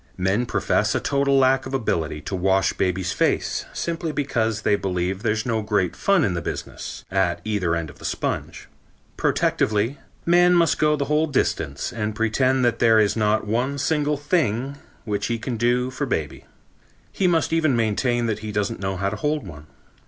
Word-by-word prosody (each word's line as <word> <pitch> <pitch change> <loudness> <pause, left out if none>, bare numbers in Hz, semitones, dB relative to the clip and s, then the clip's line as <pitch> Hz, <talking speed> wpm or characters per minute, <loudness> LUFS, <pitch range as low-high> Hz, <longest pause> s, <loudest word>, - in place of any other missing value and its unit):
Men 95 +6 0
profess - - +1
a - - +2
total 140 -1 +1
lack 130 0 +3
of 135 - -3
ability 80 - -1
to 95 - -4
wash 95 +1 +2
baby's 90 -1 -1
face - - 0
simply 165 -1 -3
because 115 -7 -1
they 105 - +3
believe 95 0 -2
there's 110 -1 0
no 115 -3 0
great 105 -4 0
fun 195 -5 +2
in 95 - +1
the 85 - -2
business, - - -6
at 95 -2 +1
either 100 -6 0
end 80 -2 -4
of - - -20
the - - -14
sponge. - - -3 0.5
Protectively, 110 +6 +1 0.3
man 175 +1 +5
must 170 -1 +3
go 150 0 +3
the 140 - -2
whole 150 +2 +1
distance 70 - -1
and 105 -2 -3
pretend 130 +4 +2
that 120 - +1
there 115 -2 +5
is 105 -1 +2
not 110 0 +1
one 125 +6 -1
single 150 +1 0
thing 140 - -1 0.3
which 105 -2 -2
he 115 - -1
can 120 +2 -4
do 120 +2 +1
for - - -3
baby. - - -3 0.7
He 190 - +1
must 165 -2 +1
even 155 -5 +2
maintain 120 +2 +1
that 110 -2 -1
he 110 0 -6
doesn't 105 +2 -2
know 95 -1 -2
how 100 +1 0
to - - -4
hold 150 -4 -1
one. 75 -4 -11
115 Hz, 185 wpm, -23 LUFS, 100-140 Hz, 0.7 s, man